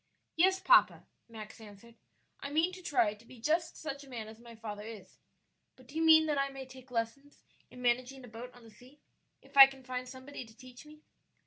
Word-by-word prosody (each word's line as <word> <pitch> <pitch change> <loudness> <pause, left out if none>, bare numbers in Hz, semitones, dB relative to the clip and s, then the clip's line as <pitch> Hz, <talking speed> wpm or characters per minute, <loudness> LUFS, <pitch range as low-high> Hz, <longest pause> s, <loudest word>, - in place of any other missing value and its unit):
"Yes, 375 +3 +4
papa," - - +4 0.2
Max 220 -1 -10
answered; 215 +2 -14 0.5
"I 280 - -6
mean 320 +5 +2
to 365 - -10
try 245 -11 +1
to 210 +1 -18
be 240 +1 -15
just 320 +7 0
such 285 -2 -6
a 275 - -15
man 230 -4 -6
as 220 +1 -12
my 235 0 -13
father 215 -2 -7
is; 215 -3 -11 0.6
but 255 - -18
do 245 - -16
you 320 - -1
mean 320 -1 +7
that 295 -2 0
I 275 0 0
may 270 -1 -8
take 260 0 -14
lessons 245 +5 -4 0.3
in 250 - -11
managing 250 +2 0
a - - -13
boat 235 +2 -9
on 245 - -16
the 225 - -15
sea, 255 +7 -19 0.4
if - - -20
I 270 -1 +12
can 270 -1 -13
find 255 0 -5
somebody 260 +1 -9
to 225 -1 -18
teach 255 +2 -14
me?" 305 0 -16
255 Hz, 220 wpm, -32 LUFS, 230-285 Hz, 0.6 s, I